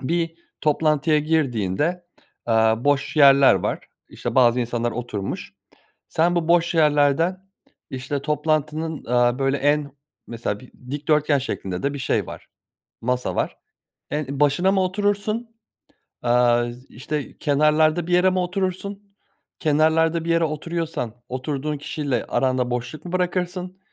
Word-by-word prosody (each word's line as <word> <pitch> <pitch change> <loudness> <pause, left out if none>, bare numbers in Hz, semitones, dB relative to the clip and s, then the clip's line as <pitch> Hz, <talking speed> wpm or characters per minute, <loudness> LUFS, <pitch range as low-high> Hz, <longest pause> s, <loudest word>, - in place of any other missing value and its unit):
bir 165 +3 -1 0.3
toplantıya 150 0 +2
girdiğinde, 150 - 0 0.4
aaa, 110 +1 +2
boş 145 +1 +1
yerler 140 -2 +7
var, - - -3 0.2
işte, - - -5
bazı 125 -1 +4
insanlar 120 0 -1
oturmuş, 110 -5 -5 0.6
sen 170 +2 +2
bu 170 -1 0
boş 170 0 +3
yerlerden, 160 +5 +2 0.4
işte, 135 +2 -4
toplantının, 155 +1 -1
aaa, 120 +1 +2
böyle, 135 0 +1
en 145 0 +1 0.4
mesela 115 -2 -4
bir 130 - -16 0.2
dikdörtgen 150 0 +1
şeklinde 95 -8 -4
de 140 - 0
bir 140 - -5
şey 125 - 0
var, - - -10 0.5
masa 125 +1 -1
var. - - -1 0.5
En 145 -2 -3
başına 150 +7 +3
mı 190 - +2
oturursun, 205 +4 -1 0.7
aaa, 120 0 +3 0.2
işte, 145 +4 -5
kenarlarda 155 +3 +2
bir 175 - -3
yere 180 +1 +5
mi 185 - 0
oturursun, 195 +2 -3 0.5
kenarlarda 160 +2 +2
bir 170 - -2
yere 165 0 +3
oturuyorsan 155 -5 -3
oturduğun 140 +3 -3
kişiyle 140 -4 -2
aranda 130 -1 0
boşluk 125 +6 -4
mu 175 - -7
bırakırsın, 180 0 -2
150 Hz, 130 wpm, -23 LUFS, 130-170 Hz, 0.7 s, yerler